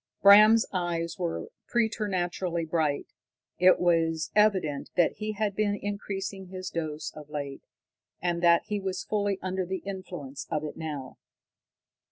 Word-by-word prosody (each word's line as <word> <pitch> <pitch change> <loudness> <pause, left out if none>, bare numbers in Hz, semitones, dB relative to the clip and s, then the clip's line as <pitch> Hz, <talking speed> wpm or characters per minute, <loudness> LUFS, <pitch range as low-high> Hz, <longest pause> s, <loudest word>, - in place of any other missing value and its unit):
Bram's 215 +3 +8
eyes 170 -1 -2
were 170 -2 -3 0.2
preternaturally 185 -7 -1
bright. 155 -3 0 0.5
It 185 +1 +6
was 165 -2 +1
evident 190 -9 +2
that 175 -2 +3
he 215 +1 -3
had 210 -1 -1
been 205 0 +1
increasing 195 -1 -4
his 185 0 -6
dose 155 -2 -4
of 150 -1 -11
late, 140 -2 -5 0.6
and 175 -1 -1
that 170 -1 +5
he 210 -1 -2
was 190 -1 -3
fully 205 -2 0
under 185 0 -1
the 185 +1 -4
influence 175 -8 -6
of 155 -2 -1
it 150 - -5
now. 150 -5 -6
180 Hz, 140 wpm, -28 LUFS, 165-200 Hz, 0.6 s, Bram's